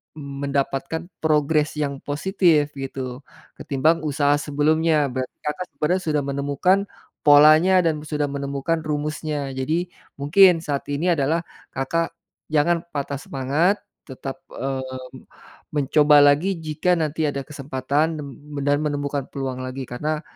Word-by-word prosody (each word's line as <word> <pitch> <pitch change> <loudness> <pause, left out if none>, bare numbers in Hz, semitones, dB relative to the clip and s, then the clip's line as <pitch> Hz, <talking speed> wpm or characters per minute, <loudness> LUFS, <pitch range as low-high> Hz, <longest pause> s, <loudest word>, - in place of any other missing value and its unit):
mendapatkan 140 +2 -3
progres 150 0 +2
yang 140 -2 -2
positif 155 -1 +2
gitu, 130 -2 -5 0.4
ketimbang 155 +4 +1
usaha 145 -1 +2
sebelumnya. 150 +1 +2
Berarti 130 0 -4
Kakak 150 +5 -3
sebenarnya 180 +5 0
sudah 150 -2 +1
menemukan 140 +6 +1 0.5
polanya 155 +5 +7
dan 160 -2 +1
sudah 150 -1 -2
menemukan 140 +3 -2
rumusnya. 150 -1 -3
Jadi 160 +7 -1 0.3
mungkin 175 +5 +6
saat 145 -3 -2
ini 160 +6 +1
adalah 160 +3 0 0.3
Kakak 165 +6 -1 0.4
jangan 165 +3 +2
patah 140 -1 -3
semangat 145 +11 0 0.3
tetap, 135 +1 -7 0.2
eee, 135 0 -3 0.9
mencoba 150 +1 +4
lagi 155 +7 +3
jika 155 +4 +1
nanti 155 0 0
ada 140 -1 -3
kesempatan 145 +2 -1
nem 145 -1 -6 0.3
dan 145 0 +2
menemukan 145 -2 -2
peluang 135 -2 -4
lagi 130 +1 -5
karena 150 +5 -3
145 Hz, 120 wpm, -23 LUFS, 140-160 Hz, 0.9 s, polanya